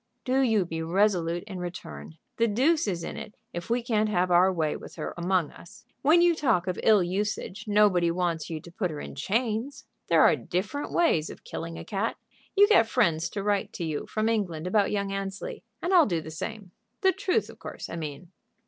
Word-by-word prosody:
Do 255 Hz, +1 st, +2 dB
you 225 Hz, -7 st, +3 dB
be 160 Hz, -1 st, -4 dB
resolute 175 Hz, -1 st, +1 dB
in 195 Hz, -3 st, -7 dB
return. 80 Hz, -, -7 dB, 0.2 s
The 230 Hz, -, +3 dB
deuce 270 Hz, +7 st, +2 dB
is 175 Hz, -4 st, -2 dB
in -, -, -5 dB
it 210 Hz, -, -8 dB, 0.2 s
if 175 Hz, +5 st, -6 dB
we 235 Hz, +1 st, +1 dB
can't 215 Hz, -3 st, +1 dB
have 180 Hz, -3 st, +1 dB
our 180 Hz, +2 st, +5 dB
way 160 Hz, -4 st, 0 dB
with -, -, -10 dB
her -, -, -5 dB
among 175 Hz, -2 st, 0 dB
us. 170 Hz, -, -15 dB, 0.2 s
When 325 Hz, +5 st, +5 dB
you 350 Hz, -1 st, +5 dB
talk 255 Hz, -, +1 dB
of 180 Hz, -2 st, -3 dB
ill 210 Hz, -4 st, +5 dB
usage 195 Hz, +2 st, -3 dB
nobody 205 Hz, -5 st, +4 dB
wants 170 Hz, -2 st, -1 dB
you 160 Hz, -2 st, -4 dB
to 170 Hz, -, -13 dB
put 180 Hz, +1 st, -2 dB
her 150 Hz, -2 st, -6 dB
in -, -, -7 dB
chains. 225 Hz, -, -2 dB, 0.2 s
There -, -, +5 dB
are -, -, +6 dB
different 200 Hz, +11 st, -3 dB
ways 170 Hz, -, +2 dB
of -, -, -11 dB
killing 165 Hz, 0 st, -6 dB
a -, -, -8 dB
cat. 210 Hz, +2 st, -2 dB, 0.4 s
You 405 Hz, +1 st, +7 dB
get 320 Hz, -, +5 dB
friends 165 Hz, -3 st, +2 dB
to 200 Hz, -, -4 dB
write 205 Hz, -1 st, 0 dB
to 175 Hz, -, -5 dB
you 155 Hz, -2 st, -3 dB
from 215 Hz, 0 st, -1 dB
England 185 Hz, -8 st, -1 dB
about 200 Hz, +2 st, +2 dB
young 200 Hz, -1 st, -1 dB
Annesley, 195 Hz, 0 st, -5 dB, 0.2 s
and 360 Hz, -, 0 dB
I'll 345 Hz, -4 st, +7 dB
do 170 Hz, -5 st, 0 dB
the 160 Hz, 0 st, -8 dB
same. 200 Hz, +3 st, -6 dB, 0.3 s
The 380 Hz, -2 st, +5 dB
truth, 390 Hz, +2 st, 0 dB
of -, -, -13 dB
course, -, -, -7 dB
I -, -, -6 dB
mean." 155 Hz, +1 st, -6 dB
195 Hz, 210 wpm, -27 LUFS, 170-225 Hz, 0.4 s, You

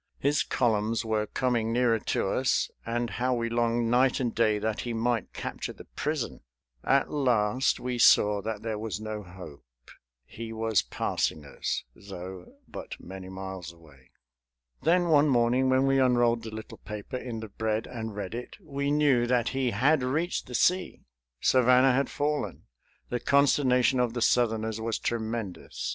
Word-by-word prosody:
His 145 Hz, +1 st, +1 dB
columns 115 Hz, -1 st, 0 dB
were 110 Hz, -1 st, 0 dB
coming 120 Hz, -3 st, 0 dB
nearer 120 Hz, -1 st, +2 dB
to 95 Hz, -, -1 dB
us; 130 Hz, +4 st, +1 dB, 0.2 s
and 120 Hz, +1 st, -1 dB
how 125 Hz, +2 st, -1 dB
we 115 Hz, -1 st, -1 dB
longed 115 Hz, 0 st, +1 dB
night 125 Hz, +1 st, +3 dB
and 120 Hz, -3 st, -1 dB
day 110 Hz, -2 st, +2 dB
that 110 Hz, +1 st, -2 dB
he 120 Hz, -, -4 dB
might 115 Hz, -1 st, -1 dB
capture -, -, -5 dB
the -, -, -13 dB
prison! 150 Hz, -3 st, -3 dB, 0.4 s
At 135 Hz, 0 st, +2 dB
last 125 Hz, -4 st, +1 dB
we 125 Hz, -1 st, -3 dB
saw 105 Hz, -3 st, +5 dB
that 110 Hz, 0 st, -5 dB
there 110 Hz, -2 st, -3 dB
was 110 Hz, -1 st, -4 dB
no 110 Hz, -1 st, -5 dB
hope. 90 Hz, -6 st, -11 dB, 0.6 s
He 115 Hz, 0 st, -8 dB
was 110 Hz, -3 st, +1 dB
passing 75 Hz, -2 st, -2 dB
us, 70 Hz, -, -3 dB
though, 95 Hz, -2 st, -9 dB, 0.2 s
but -, -, -8 dB
many 95 Hz, 0 st, -9 dB
miles 95 Hz, -2 st, -7 dB
away. 75 Hz, -6 st, -20 dB, 0.7 s
Then 175 Hz, +3 st, +3 dB
one 150 Hz, -1 st, +5 dB
morning, 125 Hz, +1 st, +3 dB
when 130 Hz, +1 st, +3 dB
we 135 Hz, 0 st, +3 dB
unrolled 120 Hz, -2 st, +3 dB
the 110 Hz, -, -7 dB
little 110 Hz, 0 st, -9 dB
paper 105 Hz, +4 st, -6 dB
in 120 Hz, -3 st, -5 dB
the 110 Hz, -1 st, -7 dB
bread 110 Hz, +1 st, -2 dB
and 110 Hz, -3 st, -6 dB
read 100 Hz, -1 st, -5 dB
it, 120 Hz, +1 st, -7 dB
we 140 Hz, -6 st, -3 dB
knew 145 Hz, -5 st, +3 dB
that 120 Hz, -2 st, +2 dB
he 135 Hz, -1 st, 0 dB
had 135 Hz, +8 st, +3 dB
reached 155 Hz, +8 st, -1 dB
the 125 Hz, -, -6 dB
sea. 180 Hz, +8 st, +1 dB, 0.4 s
Savannah 125 Hz, +1 st, +5 dB
had 135 Hz, +2 st, +1 dB
fallen. 150 Hz, +1 st, -2 dB, 0.5 s
The 120 Hz, -, -1 dB
consternation 135 Hz, -2 st, +3 dB
of 120 Hz, -1 st, 0 dB
the 120 Hz, -, +1 dB
Southerners 110 Hz, -3 st, +1 dB
was 115 Hz, 0 st, -1 dB
tremendous. 110 Hz, -6 st, -4 dB
115 Hz, 165 wpm, -28 LUFS, 110-130 Hz, 0.7 s, saw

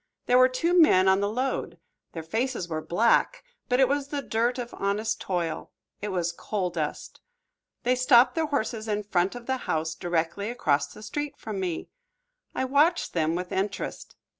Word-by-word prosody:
There 250 Hz, +1 st, +4 dB
were 255 Hz, 0 st, +6 dB
two 335 Hz, +8 st, +3 dB
men 185 Hz, -, +5 dB
on 190 Hz, 0 st, +5 dB
the 200 Hz, 0 st, 0 dB
load. 255 Hz, +5 st, -2 dB, 0.4 s
Their 165 Hz, -, -5 dB
faces 225 Hz, +3 st, -2 dB
were 155 Hz, -2 st, -3 dB
black, 235 Hz, -, +2 dB, 0.3 s
but 250 Hz, +1 st, +2 dB
it 265 Hz, -, +6 dB
was 280 Hz, +1 st, -1 dB
the 285 Hz, -1 st, -4 dB
dirt 235 Hz, +2 st, 0 dB
of 240 Hz, -1 st, -5 dB
honest 205 Hz, +3 st, -1 dB
toil, 170 Hz, -4 st, -3 dB, 0.3 s
it 210 Hz, -, -3 dB
was 175 Hz, -4 st, -1 dB
coal 185 Hz, +1 st, -3 dB
dust. 155 Hz, -3 st, -5 dB, 0.6 s
They 250 Hz, 0 st, +3 dB
stopped 255 Hz, -1 st, +5 dB
the 325 Hz, -1 st, 0 dB
horses 230 Hz, -6 st, -2 dB
in 210 Hz, -1 st, -1 dB
front 190 Hz, 0 st, 0 dB
of 245 Hz, -1 st, -8 dB
the 260 Hz, +1 st, -1 dB
house 160 Hz, 0 st, 0 dB
directly 175 Hz, +5 st, -2 dB
across 150 Hz, -13 st, +1 dB
the 215 Hz, -, -13 dB
street 295 Hz, +5 st, -4 dB
from 215 Hz, -3 st, -5 dB
me. 180 Hz, -3 st, -3 dB, 0.7 s
I -, -, 0 dB
watched 295 Hz, +6 st, +2 dB
them 160 Hz, -1 st, +1 dB
with 180 Hz, 0 st, -4 dB
interest. 195 Hz, +2 st, -3 dB
215 Hz, 180 wpm, -26 LUFS, 175-255 Hz, 0.7 s, were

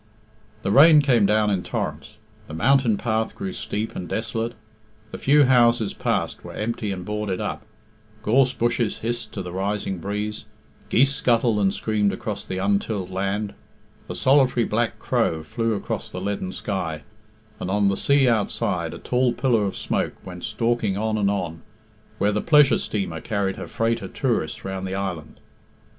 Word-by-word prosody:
The 95 Hz, -, 0 dB
rain 150 Hz, +5 st, +8 dB
came 120 Hz, -7 st, +4 dB
down 105 Hz, 0 st, +3 dB
in 95 Hz, -2 st, 0 dB
torrents, -, -, -4 dB, 0.3 s
the 75 Hz, -, -7 dB
mountain 125 Hz, +2 st, +3 dB
path 110 Hz, 0 st, -1 dB
grew 195 Hz, -1 st, -4 dB
steep 110 Hz, -8 st, -4 dB
and 90 Hz, -2 st, -5 dB
desolate, 115 Hz, +1 st, -2 dB, 0.6 s
the -, -, -7 dB
few 145 Hz, +2 st, +5 dB
houses 120 Hz, -4 st, +4 dB
passed -, -, -2 dB
were -, -, -9 dB
empty 110 Hz, -1 st, -2 dB
and 90 Hz, -2 st, -5 dB
boarded 105 Hz, -2 st, -2 dB
up, 105 Hz, -, -3 dB, 0.6 s
gorse 125 Hz, +4 st, +4 dB
bushes 120 Hz, -2 st, 0 dB
hissed 120 Hz, +1 st, -2 dB
to -, -, -4 dB
the 90 Hz, -, -6 dB
rising 95 Hz, 0 st, -2 dB
breeze, 105 Hz, +3 st, -4 dB, 0.4 s
geese 140 Hz, +3 st, +4 dB
scuttled 120 Hz, -5 st, +2 dB
and 100 Hz, -1 st, +3 dB
screamed 105 Hz, -1 st, 0 dB
across -, -, -4 dB
the 95 Hz, -, -4 dB
untilled 100 Hz, 0 st, -1 dB
land, 100 Hz, +2 st, -2 dB, 0.6 s
a -, -, -4 dB
solitary 130 Hz, -3 st, +4 dB
black 115 Hz, +1 st, 0 dB
crow 80 Hz, -1 st, 0 dB
flew 115 Hz, +8 st, -1 dB
across -, -, -4 dB
the 90 Hz, -, -5 dB
leaden 95 Hz, -1 st, -3 dB
sky, 90 Hz, -7 st, -4 dB, 0.6 s
and -, -, -4 dB
on 100 Hz, +1 st, +2 dB
the 100 Hz, -, +2 dB
sea 140 Hz, +4 st, +3 dB
outside 100 Hz, -6 st, 0 dB
a -, -, -7 dB
tall 125 Hz, -1 st, +1 dB
pillar 120 Hz, -4 st, +2 dB
of 95 Hz, -, -3 dB
smoke -, -, -1 dB
went 90 Hz, -2 st, -8 dB
stalking 110 Hz, -2 st, 0 dB
on 110 Hz, +1 st, 0 dB
and 100 Hz, -2 st, +2 dB
on, 90 Hz, -5 st, -3 dB, 0.6 s
where 105 Hz, 0 st, +2 dB
the 105 Hz, 0 st, 0 dB
pleasure 150 Hz, -3 st, +5 dB
steamer 95 Hz, -6 st, -3 dB
carried 100 Hz, -3 st, -1 dB
her -, -, -6 dB
freight 115 Hz, 0 st, 0 dB
of -, -, -8 dB
tourists -, -, -1 dB
round 95 Hz, 0 st, -4 dB
the 95 Hz, -, -3 dB
island. 90 Hz, -5 st, -5 dB
105 Hz, 170 wpm, -23 LUFS, 95-120 Hz, 0.6 s, rain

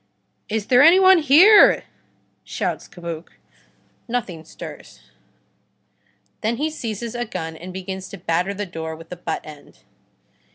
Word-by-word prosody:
"Is 215 Hz, -1 st, -2 dB
there 250 Hz, +2 st, +5 dB
any 335 Hz, +5 st, +7 dB
one 375 Hz, -1 st, +6 dB
here?" 335 Hz, +9 st, +6 dB, 0.6 s
shouts -, -, -4 dB
Cabuc. 170 Hz, -2 st, -8 dB, 0.7 s
Nothing 210 Hz, -10 st, -4 dB
stirs. 60 Hz, -, -12 dB, 1.3 s
Then 225 Hz, +2 st, -1 dB
he 310 Hz, +3 st, -2 dB
seizes 230 Hz, -5 st, -5 dB
a 240 Hz, 0 st, -3 dB
gun 165 Hz, -8 st, -6 dB
and 180 Hz, +3 st, -9 dB
begins 190 Hz, 0 st, -7 dB
to 195 Hz, -, -9 dB
batter 180 Hz, +3 st, -1 dB
the 205 Hz, +1 st, -4 dB
door 160 Hz, -3 st, -6 dB
with 165 Hz, +1 st, -14 dB
the 180 Hz, -, -6 dB
butt 170 Hz, -2 st, -4 dB
end. 150 Hz, -2 st, -14 dB
195 Hz, 135 wpm, -21 LUFS, 165-245 Hz, 1.3 s, any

